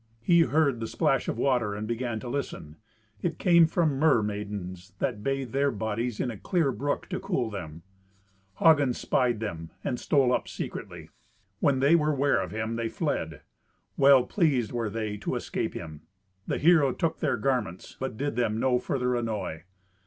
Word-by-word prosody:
He 170 +7 +5
heard 150 -6 +2
the 115 - -3
splash 135 +3 +1
of - - -2
water 120 -5 +1
and 105 +1 -4
began 120 -1 -2
to - - -7
listen. 120 - -5 0.4
It 165 -2 -2
came 170 -3 +5
from 155 -5 +1
mermaidens 105 - -1
that 120 -6 -2
bathed 135 -2 -2
their 140 +1 +2
bodies 110 0 -3
in 125 - -1
a 110 - -8
clear 165 -7 +1
brook 140 +5 -2
to 185 -1 -3
cool 175 - -2
them. 85 -5 -7 0.7
Hagen 145 -6 +4
spied 120 -4 +1
them, 80 -6 -5
and 125 - -2
stole 135 -4 +3
up - - -1
secretly. - - -7 0.5
When 135 -2 +2
they 145 +5 +5
were 150 -2 +2
ware 140 -3 +2
of 95 - -4
him, 110 +3 -3
they 115 -1 -2
fled. - - -3 0.5
Well 135 -2 +6
pleased 140 - +1
were 115 -3 -2
they 105 -1 -3
to - - -3
escape - - -3
him. 80 -2 -7 0.5
The - - -1
hero 155 -4 +5
took 165 -1 -1
their - - 0
garments, 120 -10 -2
but 130 -4 -4
did 145 -1 -2
them 115 -2 0
no 125 0 +2
further 125 -1 -1
annoy. 105 -9 -3
125 Hz, 175 wpm, -27 LUFS, 110-140 Hz, 0.7 s, Well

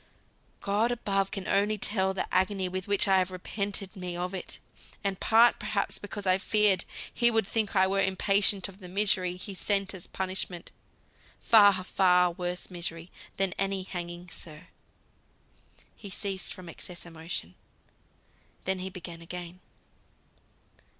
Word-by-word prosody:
God 210 +4 +1
above 195 -5 0 0.2
only 205 +2 +2
can - - -18
tell 190 -2 +2
the 190 - -4
agony 190 0 +2
with 185 0 -4
which 200 0 +2
I've 190 -1 +3
repented 195 +2 -3
me 180 -2 -5
of 180 +2 -3
it, 185 - -6 0.5
and 195 -2 -1
part 230 +2 +5
perhaps 215 -1 -1
because 205 0 -6
I 185 0 +3
feared 210 -1 +3 0.3
He 240 -1 +4
would 225 -2 +2
think 215 0 -1
I 190 0 +6
were 195 +1 +1
impatient 195 +1 +3
of 195 0 -13
the 185 - -10
misery 185 -2 +2
He 190 +2 -7
sent 195 +1 +1
as 185 -2 -8
punishment 185 -2 -4 0.7
far, 205 -4 +6
far 180 -1 +4
worse 180 +1 -5
misery 170 -1 -4 0.3
than 195 -2 +1
any 195 -1 0
hanging, 175 -1 -6
sir." 155 +2 -5 1.3
He 200 - -10
ceased 195 0 -3
from 185 -1 -9
excess 175 +1 -9
of 170 - -12
emotion. 160 - -5 1.1
Then 190 0 -1
he 185 +1 -4
began 175 -2 -8
again. 175 +1 -8
190 Hz, 145 wpm, -29 LUFS, 180-200 Hz, 1.3 s, I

